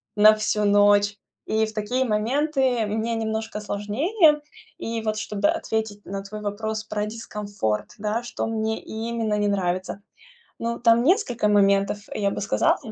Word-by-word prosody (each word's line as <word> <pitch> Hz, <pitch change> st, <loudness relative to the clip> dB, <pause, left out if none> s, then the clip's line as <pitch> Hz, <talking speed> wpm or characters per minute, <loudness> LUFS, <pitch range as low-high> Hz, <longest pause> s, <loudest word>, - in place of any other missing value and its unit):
на 215 Hz, +1 st, +8 dB
всю 215 Hz, 0 st, 0 dB
ночь. 205 Hz, 0 st, +4 dB, 0.3 s
И 220 Hz, 0 st, +1 dB
в 220 Hz, -, -8 dB
такие 240 Hz, +5 st, 0 dB
моменты 255 Hz, +2 st, +1 dB
мне 220 Hz, +2 st, -1 dB
немножко 220 Hz, -1 st, -3 dB
сложнее. 295 Hz, -, +2 dB, 0.4 s
И 230 Hz, 0 st, -3 dB
вот, 215 Hz, -1 st, -2 dB
чтобы 210 Hz, +6 st, 0 dB
ответить 220 Hz, -10 st, -2 dB
на 195 Hz, 0 st, -5 dB
твой 210 Hz, +2 st, -8 dB
вопрос 215 Hz, +1 st, -3 dB
про 210 Hz, -1 st, -2 dB
дискомфорт, 205 Hz, -, -3 dB
да, 215 Hz, +3 st, -2 dB
что 240 Hz, -, -4 dB
мне 220 Hz, 0 st, -2 dB
именно 225 Hz, 0 st, -3 dB
не 205 Hz, -, +1 dB
нравится. 185 Hz, 0 st, -1 dB, 0.6 s
Ну, 235 Hz, 0 st, -2 dB
там 235 Hz, 0 st, +4 dB
несколько 290 Hz, -, +2 dB
моментов, 200 Hz, 0 st, +3 dB
я 200 Hz, -2 st, 0 dB
бы -, -, -4 dB
сказала, 205 Hz, -, +2 dB
215 Hz, 150 wpm, -24 LUFS, 205-230 Hz, 0.6 s, на